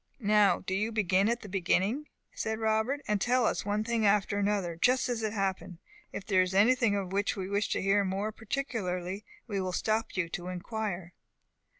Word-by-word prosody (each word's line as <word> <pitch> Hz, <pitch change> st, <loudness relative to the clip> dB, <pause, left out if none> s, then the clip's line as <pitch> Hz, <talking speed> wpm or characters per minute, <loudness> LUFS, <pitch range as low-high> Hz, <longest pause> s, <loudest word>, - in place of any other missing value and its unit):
"Now 210 Hz, -2 st, +4 dB
do 190 Hz, -, -4 dB
you 210 Hz, +4 st, 0 dB
begin 200 Hz, -1 st, +2 dB
at 235 Hz, 0 st, -1 dB
the -, -, -9 dB
beginning," 195 Hz, -, 0 dB, 0.3 s
said 220 Hz, 0 st, -2 dB
Robert, 220 Hz, +5 st, 0 dB
"and 210 Hz, -2 st, 0 dB
tell 245 Hz, +1 st, +3 dB
us 205 Hz, -, -1 dB
one 210 Hz, +1 st, 0 dB
thing 230 Hz, 0 st, 0 dB
after 205 Hz, 0 st, +2 dB
another, 200 Hz, -4 st, 0 dB
just 250 Hz, +10 st, +2 dB
as 240 Hz, -2 st, -2 dB
it 215 Hz, -1 st, -1 dB
happened. 190 Hz, -4 st, -2 dB, 0.3 s
If 195 Hz, -, -6 dB
there 190 Hz, -3 st, +3 dB
is 185 Hz, +1 st, -1 dB
anything 230 Hz, +1 st, +4 dB
of 195 Hz, -2 st, -3 dB
which 200 Hz, +1 st, 0 dB
we 190 Hz, -2 st, -4 dB
wish 200 Hz, +1 st, 0 dB
to -, -, -1 dB
hear 200 Hz, +1 st, +3 dB
more 195 Hz, +3 st, -2 dB
particularly, 205 Hz, -6 st, -3 dB, 0.2 s
we 200 Hz, -5 st, -2 dB
will 185 Hz, -1 st, -2 dB
stop 220 Hz, +3 st, -1 dB
you 175 Hz, -3 st, +1 dB
to 175 Hz, +1 st, -5 dB
inquire." 185 Hz, -1 st, -4 dB
205 Hz, 195 wpm, -30 LUFS, 190-220 Hz, 0.3 s, Now